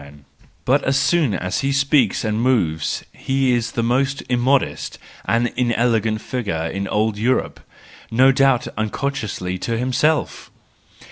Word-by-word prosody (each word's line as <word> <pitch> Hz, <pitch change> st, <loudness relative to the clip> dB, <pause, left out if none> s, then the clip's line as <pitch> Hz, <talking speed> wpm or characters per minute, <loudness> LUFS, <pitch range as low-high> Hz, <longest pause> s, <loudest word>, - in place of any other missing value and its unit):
But 135 Hz, +3 st, +2 dB
as 135 Hz, +1 st, +1 dB
soon 145 Hz, -, +2 dB
as 90 Hz, +2 st, -2 dB
he 135 Hz, -, 0 dB
speaks 140 Hz, -5 st, +2 dB
and 110 Hz, +1 st, -1 dB
moves 85 Hz, -12 st, 0 dB
he 135 Hz, -1 st, 0 dB
is 120 Hz, -1 st, -1 dB
the 115 Hz, -, -1 dB
most 135 Hz, +4 st, 0 dB
immodest 130 Hz, +2 st, 0 dB, 0.3 s
and 120 Hz, +1 st, +1 dB
inelegant 115 Hz, -3 st, +1 dB
figure 100 Hz, -11 st, -3 dB
in 95 Hz, +4 st, -3 dB
old 105 Hz, +1 st, 0 dB
Europe 125 Hz, +4 st, 0 dB, 0.3 s
— -, -, -21 dB
no 130 Hz, +4 st, +5 dB
doubt 135 Hz, -2 st, +2 dB
unconsciously 110 Hz, -5 st, -3 dB
to 115 Hz, +3 st, -2 dB
himself! 130 Hz, +6 st, 0 dB
120 Hz, 135 wpm, -20 LUFS, 110-135 Hz, 0.3 s, no